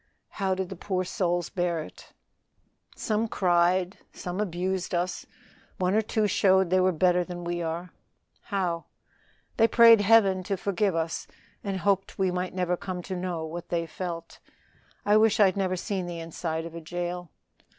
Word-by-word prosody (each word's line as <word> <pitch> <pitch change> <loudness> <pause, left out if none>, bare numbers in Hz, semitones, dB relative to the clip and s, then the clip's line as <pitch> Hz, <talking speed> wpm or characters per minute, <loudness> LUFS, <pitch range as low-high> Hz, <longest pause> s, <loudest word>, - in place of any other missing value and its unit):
"How 190 -2 -1
did 190 -1 -3
the 190 - -6
poor 185 0 -2
souls 175 -1 -1
bear 175 -4 -1
it?" - - -14 0.8
"Some 220 +1 -1
cried, 180 -1 +2
some 180 +2 -4
abused 185 -1 -2
us, 180 +1 -2 0.5
one 185 -1 +1
or 215 - +4
two 215 0 0
showed 190 -2 +3
they 185 - +4
were 185 0 +4
better 180 +1 +3
than 175 0 -7
we 175 0 -2
are." 165 +2 -4 0.5
"How?" 180 -5 -2 0.7
"They 225 - +6
prayed 230 -1 +7
Heaven 200 -3 +5
to 195 - -1
forgive 195 -1 0
us 165 0 -2 0.4
and 195 -2 -3
hoped 195 +1 0
we 190 -1 +1
might 180 +1 -3
never 180 -1 0
come 180 0 -5
to 190 - -5
know 175 -3 -3
what 170 +2 -7
they 170 -1 0
felt. 170 0 -6 0.7
I 205 +1 +5
wish 220 0 +4
I'd 195 -3 +5
never 190 -2 0
seen 185 0 -3
the 175 -1 -5
inside 165 0 -4
of 165 - -8
a 170 - -7
jail. 175 +1 -4
180 Hz, 170 wpm, -27 LUFS, 175-195 Hz, 0.8 s, prayed